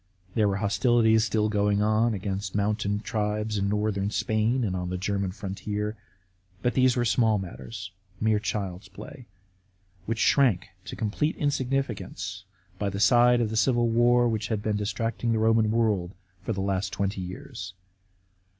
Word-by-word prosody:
There 110 Hz, -2 st, +3 dB
were 100 Hz, -, 0 dB
hostilities 110 Hz, +1 st, +3 dB
still 110 Hz, -2 st, +1 dB
going 105 Hz, -1 st, +1 dB
on 110 Hz, +1 st, +2 dB
against 95 Hz, 0 st, -4 dB
mountain 105 Hz, 0 st, 0 dB
tribes 105 Hz, -1 st, -2 dB
hi -, -, 0 dB
northern 100 Hz, -1 st, 0 dB
Spain, 110 Hz, +4 st, 0 dB
and 95 Hz, -4 st, -1 dB
on 90 Hz, -1 st, -3 dB
the 90 Hz, -, -2 dB
German 100 Hz, 0 st, -1 dB
frontier. 105 Hz, +2 st, -4 dB, 0.7 s
But 125 Hz, -1 st, +1 dB
these 130 Hz, 0 st, +3 dB
were 120 Hz, -, +1 dB
small 110 Hz, -2 st, +3 dB
matters, 95 Hz, +1 st, -7 dB, 0.3 s
mere 110 Hz, -1 st, +2 dB
child's 100 Hz, -3 st, -4 dB
play, 125 Hz, +7 st, -11 dB, 0.8 s
which 115 Hz, +1 st, -1 dB
shrank 115 Hz, -8 st, +3 dB, 0.2 s
to -, -, -6 dB
complete 115 Hz, +9 st, -1 dB
insignificance 125 Hz, -9 st, -2 dB, 0.3 s
by 100 Hz, -, 0 dB
the 100 Hz, 0 st, -4 dB
side 120 Hz, +4 st, +5 dB
of 110 Hz, -2 st, -1 dB
the -, -, -3 dB
Civil 120 Hz, 0 st, +2 dB
War 120 Hz, +1 st, +4 dB
which 110 Hz, -1 st, -1 dB
had 110 Hz, -3 st, -2 dB
been 110 Hz, -1 st, 0 dB
distracting 115 Hz, +3 st, -1 dB
the -, -, +1 dB
Roman 110 Hz, 0 st, +3 dB
world 105 Hz, -5 st, 0 dB, 0.3 s
for 105 Hz, -, -3 dB
the 95 Hz, -3 st, -2 dB
last 95 Hz, 0 st, -1 dB
twenty 100 Hz, -1 st, -2 dB
years. 90 Hz, 0 st, -7 dB
105 Hz, 160 wpm, -27 LUFS, 100-115 Hz, 0.8 s, side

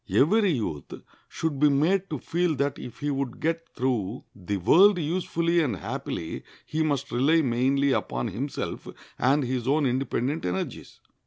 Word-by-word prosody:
Every 200 Hz, +5 st, +4 dB
youth 90 Hz, -, -4 dB, 0.4 s
should 155 Hz, -4 st, -3 dB
be 150 Hz, 0 st, +5 dB
made 180 Hz, +8 st, +2 dB
to 150 Hz, -, -3 dB
feel 170 Hz, +4 st, 0 dB
that 140 Hz, +1 st, -1 dB
if 125 Hz, -, -9 dB
he 145 Hz, 0 st, 0 dB
would 135 Hz, -3 st, -3 dB
get 165 Hz, +1 st, -2 dB
through 120 Hz, -4 st, -1 dB
the 100 Hz, +1 st, -3 dB
world 180 Hz, -, +6 dB
usefully 170 Hz, +1 st, 0 dB
and 130 Hz, -9 st, 0 dB
happily 80 Hz, -2 st, -5 dB, 0.2 s
he 155 Hz, -, -2 dB
must 140 Hz, -3 st, -1 dB
rely 150 Hz, +7 st, +3 dB
mainly 135 Hz, +3 st, +2 dB
upon 120 Hz, -, -1 dB
himself 130 Hz, +9 st, -4 dB, 0.3 s
and 135 Hz, +4 st, +3 dB
his 125 Hz, -1 st, -2 dB
own 145 Hz, +2 st, +2 dB
independent 130 Hz, +3 st, -1 dB
energies. 90 Hz, +1 st, -4 dB
140 Hz, 155 wpm, -26 LUFS, 125-160 Hz, 0.4 s, world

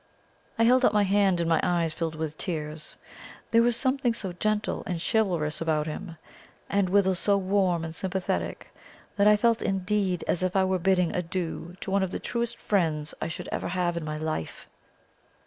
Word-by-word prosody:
I 230 Hz, -, +3 dB
held 255 Hz, +3 st, +5 dB
out 215 Hz, -, +4 dB
my 205 Hz, -, +5 dB
hand, 195 Hz, -2 st, +3 dB
and 170 Hz, -, 0 dB
my 165 Hz, -1 st, +3 dB
eyes 170 Hz, -3 st, 0 dB
filled 160 Hz, 0 st, -3 dB
with 155 Hz, -1 st, -4 dB
tears. 155 Hz, -2 st, -5 dB, 0.5 s
There 230 Hz, -, +5 dB
was 240 Hz, 0 st, +3 dB
something 260 Hz, -3 st, +1 dB
so 195 Hz, -6 st, -2 dB
gentle 215 Hz, +4 st, -1 dB
and 175 Hz, -2 st, -2 dB
chivalrous 175 Hz, -8 st, 0 dB
about 155 Hz, -2 st, +1 dB
him, 165 Hz, +2 st, -6 dB, 0.5 s
and 195 Hz, -2 st, +2 dB
withal 190 Hz, 0 st, +3 dB
so 200 Hz, +3 st, +3 dB
warm 190 Hz, -3 st, +1 dB
and 160 Hz, -, -6 dB
sympathetic, 190 Hz, +2 st, -3 dB, 0.4 s
that 200 Hz, 0 st, +4 dB
I 210 Hz, 0 st, +6 dB
felt 230 Hz, +1 st, +2 dB
indeed 195 Hz, -1 st, 0 dB
as 180 Hz, -, +1 dB
if 185 Hz, 0 st, -1 dB
I 190 Hz, -, +4 dB
were 190 Hz, 0 st, +1 dB
bidding 180 Hz, -1 st, +2 dB
adieu 175 Hz, 0 st, -4 dB
to 195 Hz, -, -4 dB
one 200 Hz, 0 st, +2 dB
of 190 Hz, -, 0 dB
the -, -, -4 dB
truest 235 Hz, -1 st, -3 dB
friends 160 Hz, -7 st, 0 dB
I -, -, -1 dB
should 165 Hz, -, -6 dB
ever -, -, -2 dB
have 175 Hz, -1 st, -1 dB
in 170 Hz, -, -3 dB
my 155 Hz, 0 st, -4 dB
life. 155 Hz, -, -4 dB
185 Hz, 190 wpm, -27 LUFS, 165-205 Hz, 0.5 s, I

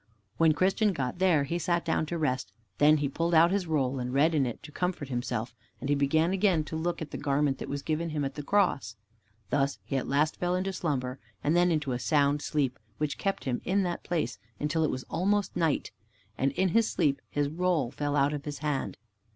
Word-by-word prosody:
When 165 Hz, -1 st, +5 dB
Christian 195 Hz, +5 st, +2 dB
got 135 Hz, +1 st, -3 dB
there 175 Hz, -6 st, +4 dB
he 170 Hz, +5 st, -2 dB
sat 170 Hz, -1 st, 0 dB
down 160 Hz, -1 st, 0 dB
to 170 Hz, -, -2 dB
rest, 130 Hz, -5 st, -1 dB, 0.3 s
then 150 Hz, +1 st, +6 dB
he 145 Hz, -1 st, 0 dB
pulled 165 Hz, +5 st, 0 dB
out 165 Hz, +2 st, +6 dB
his 195 Hz, -3 st, 0 dB
roll 135 Hz, -4 st, 0 dB
and 125 Hz, 0 st, -3 dB
read 145 Hz, +5 st, +3 dB
in 140 Hz, -4 st, +2 dB
it 120 Hz, -, -6 dB
to 150 Hz, -, -10 dB
comfort 180 Hz, -5 st, -2 dB
himself, 120 Hz, -2 st, -3 dB, 0.3 s
and 135 Hz, -, -4 dB
he -, -, +4 dB
began 155 Hz, +5 st, +2 dB
again 190 Hz, -4 st, +2 dB
to 155 Hz, -, -6 dB
look 165 Hz, +1 st, -2 dB
at 155 Hz, -, -10 dB
the -, -, -5 dB
garment 140 Hz, -1 st, +1 dB
that -, -, -6 dB
was 140 Hz, 0 st, -3 dB
given 160 Hz, +2 st, -1 dB
to -, -, -6 dB
him 145 Hz, -2 st, -1 dB
at 135 Hz, -, -3 dB
the 145 Hz, -, -5 dB
Cross. 145 Hz, -, +1 dB, 0.6 s
Thus 140 Hz, -1 st, +1 dB
he 135 Hz, -, -2 dB
at 130 Hz, -, -2 dB
last 150 Hz, +3 st, +1 dB
fell 180 Hz, 0 st, 0 dB
into 190 Hz, +1 st, -1 dB
a -, -, -10 dB
slumber, 135 Hz, -7 st, -2 dB, 0.2 s
and 150 Hz, +3 st, +2 dB
then 175 Hz, 0 st, +4 dB
into 150 Hz, -4 st, 0 dB
a 125 Hz, -, -1 dB
sound 145 Hz, 0 st, +2 dB
sleep, 140 Hz, -5 st, -1 dB, 0.2 s
which 150 Hz, -1 st, -2 dB
kept 195 Hz, -1 st, -1 dB
him 125 Hz, -2 st, -2 dB
in 195 Hz, +2 st, +1 dB
that 175 Hz, -1 st, -3 dB
place, 140 Hz, -, -2 dB, 0.2 s
until 150 Hz, +2 st, 0 dB
it 155 Hz, -, +2 dB
was 130 Hz, -, -3 dB
almost 200 Hz, +4 st, 0 dB
night, 165 Hz, -4 st, 0 dB, 0.4 s
and 135 Hz, +4 st, +1 dB
in 190 Hz, +4 st, +2 dB
his 225 Hz, +5 st, +3 dB
sleep 145 Hz, -6 st, +1 dB
his 145 Hz, -1 st, 0 dB
roll 160 Hz, -5 st, 0 dB
fell 145 Hz, 0 st, -2 dB
out 140 Hz, +1 st, +3 dB
of 145 Hz, -1 st, -5 dB
his 145 Hz, -1 st, -4 dB
hand. 140 Hz, -11 st, -2 dB
150 Hz, 230 wpm, -29 LUFS, 140-170 Hz, 0.6 s, then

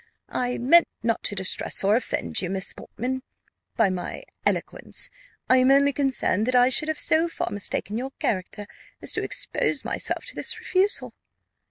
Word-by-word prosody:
"I 250 Hz, 0 st, -1 dB
meant 330 Hz, +8 st, +5 dB, 0.2 s
not 230 Hz, 0 st, 0 dB
to 205 Hz, -, 0 dB
distress 190 Hz, 0 st, 0 dB
or 200 Hz, +2 st, +4 dB
offend 235 Hz, -, -1 dB
you, 180 Hz, -, -3 dB
Miss 190 Hz, 0 st, -1 dB
Portman, 260 Hz, +3 st, -5 dB, 0.5 s
by 215 Hz, -4 st, +3 dB
my 180 Hz, -1 st, -5 dB, 0.2 s
eloquence: -, -, 0 dB, 0.4 s
I 255 Hz, -, +5 dB
am 255 Hz, +1 st, +4 dB
only 280 Hz, +1 st, +5 dB
concerned 255 Hz, -6 st, +2 dB
that 255 Hz, -, +1 dB
I 250 Hz, 0 st, +6 dB
should 305 Hz, +4 st, +1 dB
have 315 Hz, -1 st, -1 dB
so 320 Hz, +2 st, +3 dB
far 330 Hz, -, -4 dB
mistaken 205 Hz, +2 st, -2 dB
your 265 Hz, +2 st, -4 dB
character 205 Hz, +1 st, -2 dB, 0.4 s
as -, -, +2 dB
to -, -, 0 dB
expose -, -, -1 dB
myself -, -, -2 dB
to -, -, -5 dB
this -, -, 0 dB
refusal." 385 Hz, +2 st, 0 dB
245 Hz, 170 wpm, -25 LUFS, 205-275 Hz, 0.5 s, I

